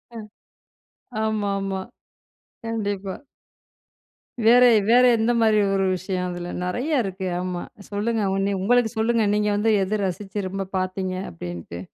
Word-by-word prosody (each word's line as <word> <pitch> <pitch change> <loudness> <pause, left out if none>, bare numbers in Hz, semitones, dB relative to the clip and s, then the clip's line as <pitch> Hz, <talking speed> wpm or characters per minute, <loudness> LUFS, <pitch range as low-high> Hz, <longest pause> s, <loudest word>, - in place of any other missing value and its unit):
அ. - - -6 1.0
ஆமாமா, 200 -3 -1 0.8
கண்டிப்பா. 205 -4 -3 1.3
வேற 245 +2 +7 0.3
வேற 250 +2 +6
எந்த 225 +2 +2
மாதிரி 220 -1 +4 0.2
ஒரு 195 0 +1
விஷயம், 185 0 -2
அதுல. 175 0 -6
நெறைய 255 - 0
இருக்கு. 190 -1 -4
ஆமா, 180 -1 -3 0.3
சொல்லுங்க 215 +2 -1 0.4
உங்களுக்கு 240 +2 +3
சொல்லுங்க, 225 0 +2
நீங்க 210 0 +1
வந்து 220 +2 +2
எது 205 +1 -1
ரசித்து 195 +1 -4
ரொம்ப 195 +1 -3
பாத்தீங்க 185 0 -2 0.2
அப்படின்ட்டு. 85 0 -7
200 Hz, 115 wpm, -23 LUFS, 185-220 Hz, 1.3 s, வேற